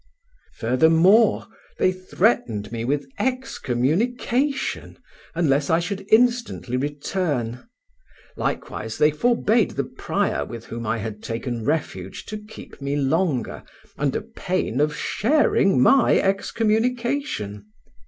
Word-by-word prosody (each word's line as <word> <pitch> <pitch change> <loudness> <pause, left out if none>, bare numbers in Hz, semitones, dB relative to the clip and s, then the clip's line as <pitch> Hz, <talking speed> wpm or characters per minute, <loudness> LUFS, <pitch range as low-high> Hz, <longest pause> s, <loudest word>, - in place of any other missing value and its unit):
Furthermore, 160 - +4 0.3
they 185 - +3
threatened 185 - 0
me 115 -1 -3
with 140 +4 -1
excommunication 245 - -1 0.4
unless 145 -4 +1
I 165 - +4
should 195 +3 -4
instantly 235 - +2
return; 145 - -2 0.7
likewise 110 +1 -4
they 150 0 +4
forbade 230 +4 +2
the - - +1
prior - - -2
with 115 -1 -8
whom 115 -1 -6
I 110 +1 0
had 105 -1 -6
taken 115 0 -4
refuge 95 - -3
to 215 - -5
keep 210 -8 -13
me 140 +1 -2
longer, 145 0 0 0.3
under 140 -2 -1
pain 185 - -2
of 150 0 +1
sharing 220 - +2
my 265 - +5
excommunication. 220 - -1
160 Hz, 105 wpm, -23 LUFS, -, 0.7 s, my